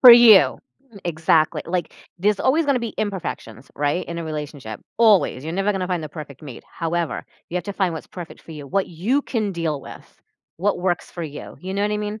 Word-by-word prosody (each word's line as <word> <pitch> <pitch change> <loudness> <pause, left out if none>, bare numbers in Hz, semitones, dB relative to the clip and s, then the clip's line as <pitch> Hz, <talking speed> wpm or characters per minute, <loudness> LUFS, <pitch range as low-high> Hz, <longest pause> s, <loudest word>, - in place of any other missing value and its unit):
For 250 - +12
you. 235 -5 +8 0.5
Exactly, 160 -1 +2
like, 175 -1 -2 0.2
there's 205 +3 +2
always 305 +4 +3
gonna 280 -3 +3
be 235 -2 -4
imperfections, 165 - -4
right, 145 +5 0
in 170 0 -5
a 170 - -3
relationship, 145 -8 -5 0.2
always, 210 - +5
you're 160 - -4
never 195 +4 +1
gonna 190 -2 -2
find 180 -2 -1
the 155 - -5
perfect 145 -3 -9
mate, 135 -6 -9
however, 170 -1 -2 0.2
you - - -8
have 175 - -2
to 200 - -4
find 190 -4 0
what's 160 - -7
perfect 175 -3 -9
for 165 - -11
you, 150 -2 -8
what 195 +7 0
you 210 - 0
can 215 -7 -1
deal 160 -5 -1
with, - - -13 0.4
what 195 +1 +1
works 175 -1 0
for 175 - -6
you, 150 -3 -7
you 185 +1 -5
know 200 - -1
what 205 +1 +1
I - - +1
mean? 210 +1 -4
175 Hz, 215 wpm, -23 LUFS, 155-205 Hz, 0.5 s, For